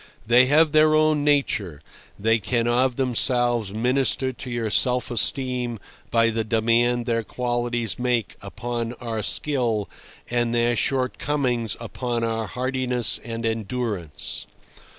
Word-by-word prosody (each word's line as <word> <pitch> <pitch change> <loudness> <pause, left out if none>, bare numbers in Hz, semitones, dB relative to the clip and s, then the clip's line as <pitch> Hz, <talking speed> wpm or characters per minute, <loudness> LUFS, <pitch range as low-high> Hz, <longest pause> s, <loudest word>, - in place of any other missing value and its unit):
They 120 +3 +5
have 155 +2 +4
their 155 0 +5
own 155 -1 +3
nature; 125 - +1 0.4
they 115 +2 +2
can 115 +3 0
of 125 +1 +2
themselves 120 -4 +1
minister 130 +4 +1
to 125 -1 -6
our 110 - -2
self 125 +2 +2
esteem 125 0 +1 0.3
by 115 0 +3
the 110 0 -1
demand 115 +2 +1
their 115 -1 0
qualities 120 -1 -2
make 125 -5 -1
upon 120 -1 -4
our 115 -3 -4
skill 110 - -1 0.4
and 120 -1 0
their 120 0 +2
shortcomings 130 -3 -1
upon 120 0 -3
our 115 -1 -1
hardiness 125 -2 0
and 115 0 -5
endurance. 110 -8 -4
120 Hz, 125 wpm, -23 LUFS, 115-125 Hz, 0.4 s, They